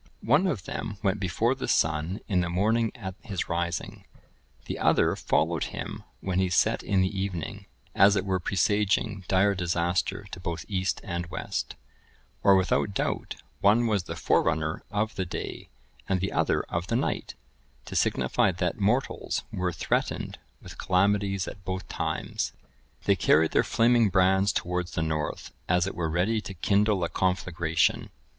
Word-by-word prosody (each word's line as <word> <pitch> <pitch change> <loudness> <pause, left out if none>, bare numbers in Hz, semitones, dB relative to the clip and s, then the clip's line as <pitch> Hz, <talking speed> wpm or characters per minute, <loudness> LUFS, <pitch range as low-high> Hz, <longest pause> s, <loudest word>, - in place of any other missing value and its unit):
One 145 +11 +4
of 120 - -2
them 100 - -5
went 100 0 +1
before 100 +6 +1
the 135 - -5
sun 80 +5 +1
in 90 -3 +2
the 90 - -2
morning 110 +6 +1
at 95 -6 -6
his 100 -5 -4
rising, 85 0 -3 0.6
the - - -4
other - - +3
followed - - +1
him - - -6 0.2
when 95 -1 -1
he 95 -1 +2
set 90 - +2
in 95 -2 +1
the 95 +1 -1
evening, 95 -4 -4 0.3
as 100 +1 +6
it 100 - 0
were 95 -1 0
presaging 100 +1 +1
dire 100 +2 +3
disaster 90 +2 -1
to - - -7
both 85 -2 -4
east 95 -4 -1
and 85 0 -3
west; - - -4 0.7
or 100 - +6
without 95 +1 +1
doubt - - -2 0.2
one 105 +4 +4
was 105 -6 +1
the - - -5
forerunner 80 0 +1
of 110 +2 -1
the 95 - -2
day, - - -6 0.4
and 95 -1 +2
the 95 +2 -2
other - - +1
of 85 +1 -3
the 115 - 0
night, 125 - -1 0.5
to - - -7
signify - - +2
that 90 +2 -2
mortals 115 +7 0
were 90 -1 -1
threatened 80 - -2 0.2
with - - -11
calamities 100 0 +1
at 100 - -9
both 95 0 -4
times. - - -2 0.5
They 100 - +3
carried 80 -2 +3
their - - +3
flaming 115 -1 +3
brands 95 +1 +3
towards 90 0 -2
the 80 - 0
north, 80 -1 -3 0.2
as 90 0 +3
it 95 - -3
were 85 -2 -2
ready 95 +7 +1
to 95 - -8
kindle 100 +1 +2
a 85 - 0
conflagration. 85 -3 0
95 Hz, 165 wpm, -27 LUFS, 90-105 Hz, 0.7 s, as